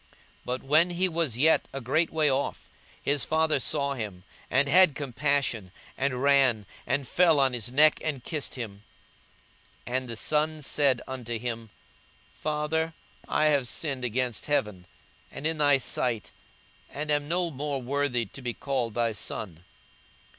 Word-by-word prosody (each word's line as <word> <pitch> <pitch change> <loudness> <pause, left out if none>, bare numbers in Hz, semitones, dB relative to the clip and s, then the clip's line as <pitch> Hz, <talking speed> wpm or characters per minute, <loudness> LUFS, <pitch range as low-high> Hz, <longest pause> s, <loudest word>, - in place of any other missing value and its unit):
But 125 +1 -3
when 155 +6 +4
he 180 +2 +1
was 165 -9 -1
yet 155 +5 +3
a 135 - -5
great 135 +7 +1
way 155 -2 +1
off, 135 0 -1 0.3
his 140 -2 +1
father 160 -2 +2
saw 140 +2 0
him, 105 -8 -6 0.3
and 135 +2 +3
had 175 -1 +6
compassion, 140 -7 -1 0.2
and 135 -1 -1
ran, 135 -6 +4 0.2
and 135 0 0
fell 165 -2 +4
on 135 -2 +3
his 120 0 -2
neck, 150 +3 +5
and 140 -5 -3
kissed 155 -1 -3
him. 105 -5 -7 1.0
42:015:021 125 - -4
And 130 -1 -3
the 115 - -4
son 155 +5 0
said 140 -3 +2
unto 120 -3 -4
him, 115 -1 -5 0.6
Father, 155 +2 -2 0.3
I 155 - +2
have 135 -4 +2
sinned 135 -1 -2
against 125 -1 -1
heaven, 105 -11 -1 0.4
and 150 - -8
in 160 -1 -1
thy 145 -2 +5
sight, 120 -6 -2 0.6
and 150 +1 -4
am 145 0 +1
no 175 +1 0
more 140 0 -3
worthy 130 -2 0
to 120 +7 -11
be 120 -2 -4
called 130 -5 -2
thy 120 -1 +1
son. 95 -5 -5
135 Hz, 155 wpm, -27 LUFS, 120-150 Hz, 1.0 s, had